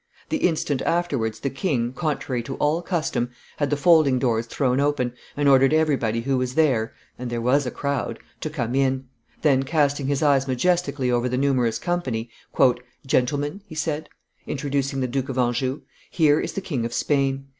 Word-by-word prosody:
The 310 - 0
instant 155 - 0
afterwards 135 -11 -1
the 140 - -1
king, 135 -5 -1
contrary 135 -4 -2
to 135 +3 -6
all 155 +3 +1
custom, 160 -9 -1 0.3
had 145 -2 0
the 145 - +1
folding 155 -4 +5
doors 115 -2 0
thrown 130 +1 0
open, 140 -4 0 0.2
and 145 -1 +2
ordered 135 +1 +5
everybody 135 -8 +1
who 135 +1 0
was 125 0 -2
there 130 -8 +2 0.2
and 125 -1 -4
there 120 0 -2
was 130 +4 +2
a - - 0
crowd 140 -4 -2 0.2
to 155 - -3
come 125 -6 -3
in; 135 -1 +1 0.4
then, 140 -4 +4
casting 145 -1 +1
his 140 +1 0
eyes 140 -2 +3
majestically 145 -1 +1
over 120 +1 +1
the 125 - -1
numerous 130 -4 +1
company, 130 -10 -2 0.7
"Gentlemen," 145 +7 0
he 160 - -10
said, 155 0 -2 0.4
introducing 140 -1 -1
the 130 - 0
Duke 135 +1 -2
of 130 - -4
Anjou, 130 +2 0 0.3
"here 155 -2 +3
is - - -3
the 195 - -3
King 140 -11 -3
of 115 +1 -3
Spain. 135 -1 0
135 Hz, 175 wpm, -24 LUFS, 125-150 Hz, 0.7 s, folding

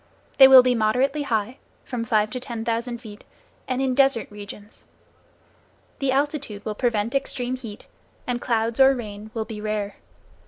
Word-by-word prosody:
They 265 - +11
will 260 -1 +9
be 250 0 +2
moderately 250 +6 +1
high, 235 -2 -2 0.3
from 240 -3 -4
five 215 -2 +1
to 255 - -3
ten 235 -3 -6
thousand 235 +1 -2
feet, 220 -3 -12 0.4
and 255 +1 -1
in 260 -1 +1
desert 270 -4 +2
regions. 205 0 -11 1.2
The 275 -1 0
altitude 275 -7 -2
will 215 - -2
prevent 230 0 -1
extreme 255 -2 -1
heat, 225 -5 -10 0.4
and 245 -1 -3
clouds 230 0 -1
or 270 0 +6
rain 215 -3 -8
will 220 -1 -2
be 215 -2 -8
rare. 210 -1 -3
235 Hz, 160 wpm, -23 LUFS, 215-260 Hz, 1.2 s, They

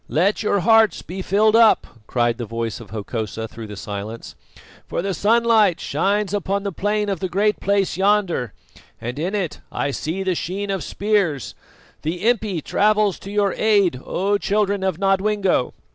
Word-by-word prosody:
"Let 190 +7 +1
your 200 -2 +1
hearts 225 +1 +4
be 190 +2 -6
filled 210 +4 +3
up!" 230 -1 +5 0.2
cried 120 -1 0
the 120 - -3
voice 115 0 -4
of 115 -4 -12
Hokosa 110 0 -4
through 110 0 -9
the 105 - -8
silence; 105 +3 -6 0.5
"for - - -3
the 195 0 -1
sunlight 215 -2 +3
shines 200 +6 0
upon 200 0 -1
the 200 - -2
plain 210 +3 -1
of 195 -4 -2
the 185 - -3
Great 210 +3 +1
Place 200 -2 0
yonder, 190 - +1 0.5
and 125 +4 -5
in 180 +6 -2
it 180 -7 -3
I 140 - -1
see 165 +7 -3
the 190 -1 +1
sheen 195 +4 -3
of 195 - -2
spears. 200 - 0 0.5
The 175 +7 -2
impi 215 -8 +1
travels 210 -1 +2
to 195 - -9
your 205 -2 +1
aid, 200 -11 +2
O 200 +2 0
children 205 -1 0
of 190 -4 0
Nodwengo." 195 -5 +1
195 Hz, 170 wpm, -21 LUFS, 155-205 Hz, 0.5 s, up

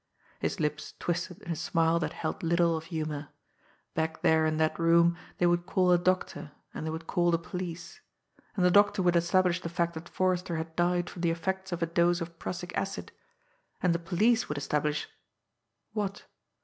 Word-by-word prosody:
His - - -2
lips 150 -1 -2
twisted 175 +3 -3
in 175 - -5
a - - 0
smile 165 +2 +2
that 160 - -2
held 155 - -4
little 170 0 +3
of 160 0 -5
humour. 155 -3 -4 0.7
Back 160 0 -2
there 160 0 +4
in 155 0 0
that 155 +1 +1
room 170 +1 +5 0.2
they 175 - +2
would 175 0 +2
call 185 -1 +3
a 175 - +5
doctor, 185 -4 -1 0.2
and - - -5
they 160 - -2
would 160 +1 -5
call 175 +1 +2
the 170 - +3
police. 175 0 -6 0.5
And 185 -4 +2
the 180 - +5
doctor 205 0 +5
would 175 -1 +3
establish 180 +1 +3
the 170 - -4
fact 170 0 0
that 160 +1 -8
Forrester 180 -2 0
had 160 0 -5
died 175 0 +1
from 175 - -8
the 170 - +2
effects 190 +3 -2
of 175 -1 -1
a - - +3
dose 170 +1 +2
of 170 -1 -7
prussic 175 0 -5
acid; 195 0 -3 0.7
and 180 -2 +2
the 170 - 0
police 210 +8 +2
would 150 - -2
establish 150 +1 -1 0.9
what? 205 -2 -3
170 Hz, 190 wpm, -29 LUFS, 160-180 Hz, 0.9 s, room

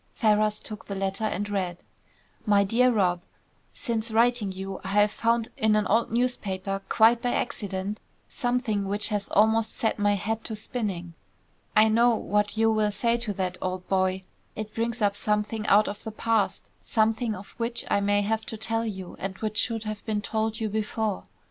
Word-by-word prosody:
Ferrars 215 -1 +2
took 215 -1 -9
the 200 - -4
letter 195 +2 -1
and 205 -1 -2
read: 185 -4 -3 0.6
"MY 205 -1 +5
DEAR 245 +5 +3
ROB., 180 -6 +1 0.5
Since 230 -3 -1
writing 230 -2 +2
you, 190 0 -6
I - - -6
have 205 +1 +3
found 230 +1 +1
in 215 -1 +3
an 210 -1 +2
old 225 +3 +2
newspaper, 195 -5 -1
quite 230 +1 +5
by 245 -1 0
accident, 200 -2 -3 0.3
something 245 -5 -1
which 205 +3 +1
has 205 -2 -2
almost 220 +1 +3
set 220 -1 0
my 205 0 +3
head 220 +3 -2
to 220 - -4
spinning. 200 -6 -4 0.6
I 215 +1 +7
know 235 +2 +4
what 210 0 0
you 225 0 +4
will 215 -1 +2
say 230 +3 +1
to 235 -3 -2
that, 185 -1 -3
old 185 0 -3
boy. 190 0 +1 0.3
It 215 0 -6
brings 230 0 -2
up 200 -1 +2
something 210 +1 -1
out 210 +1 +5
of 205 - -6
the - - -4
past; 220 -3 0
something 225 0 +1
of 195 +1 -10
which 235 0 -1
I - - +4
may 205 0 +2
have 220 +2 -1
to 220 - -5
tell 225 +1 -1
you 190 -4 -6
and 195 0 -4
which 215 -1 -1
should 225 -2 0
have 215 -1 -5
been 210 -1 0
told 220 0 -1
you 220 - -1
before. 215 -1 -2
215 Hz, 185 wpm, -26 LUFS, 200-225 Hz, 0.6 s, I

